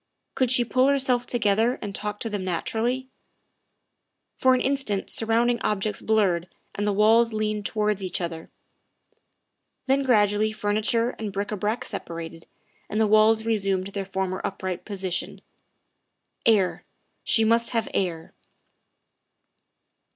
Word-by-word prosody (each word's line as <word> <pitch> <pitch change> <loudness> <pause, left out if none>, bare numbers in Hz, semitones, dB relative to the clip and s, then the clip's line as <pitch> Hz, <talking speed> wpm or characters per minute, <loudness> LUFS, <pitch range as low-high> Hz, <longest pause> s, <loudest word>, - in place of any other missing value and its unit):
Could 255 -2 +1
she 245 -1 +3
pull 255 +4 +2
herself 260 -3 +1
together 225 +1 +1
and 205 -2 -6
talk 210 +1 -4
to 225 - -1
them 205 -2 -3
naturally? 230 +8 -1 1.3
For 260 0 +4
an 255 - 0
instant 265 -8 -1
surrounding 235 +2 +1
objects 210 0 -1
blurred 190 -6 +1 0.3
and 205 +1 -2
the - - +2
walls 225 +3 +4
leaned 215 -1 -1
towards 210 -2 0
each 185 -2 -2
other; 165 -2 -5 1.4
then 270 +1 +2
gradually 215 -4 +3
furniture 215 +3 0
and 215 -2 -4
bric 200 +2 -3
a - - -1
brac 210 +4 -2
separated, 165 0 -7 0.4
and 215 - -1
the 220 - +4
walls 215 +1 +4
resumed 195 -4 0
their 200 0 -4
former 190 -1 -3
upright 185 -2 -4
position. 190 -4 -3 1.1
Air 205 -5 +3 0.4
she 225 - +3
must 230 +1 +3
have 230 -2 -1
air. 170 -4 -2
215 Hz, 130 wpm, -25 LUFS, 195-230 Hz, 1.4 s, For